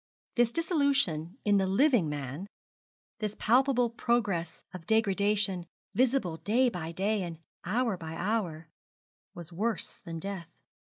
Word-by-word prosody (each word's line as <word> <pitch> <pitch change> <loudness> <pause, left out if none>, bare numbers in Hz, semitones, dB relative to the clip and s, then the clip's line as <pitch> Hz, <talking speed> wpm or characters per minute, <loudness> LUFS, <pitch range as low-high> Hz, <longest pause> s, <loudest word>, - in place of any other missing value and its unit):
This 240 -1 +3
dissolution 280 - +1
in 205 -1 +4
the 190 - +1
living 210 - +3
man, 145 +5 -5 0.7
this 210 -2 -2
palpable 250 0 +3
progress 205 -9 -1
of 180 -3 -9
degradation, 205 -4 +2 0.3
visible 235 -7 +1
day 240 +8 +2
by 165 -6 -5
day 200 +4 0
and 170 -3 -5 0.3
hour 220 +2 +1
by 160 -2 -7
hour, 175 -5 -2 0.7
was 170 0 -9
worse 210 +1 -2
than 165 -1 -7
death. 185 -1 -5
200 Hz, 125 wpm, -30 LUFS, 170-235 Hz, 0.7 s, in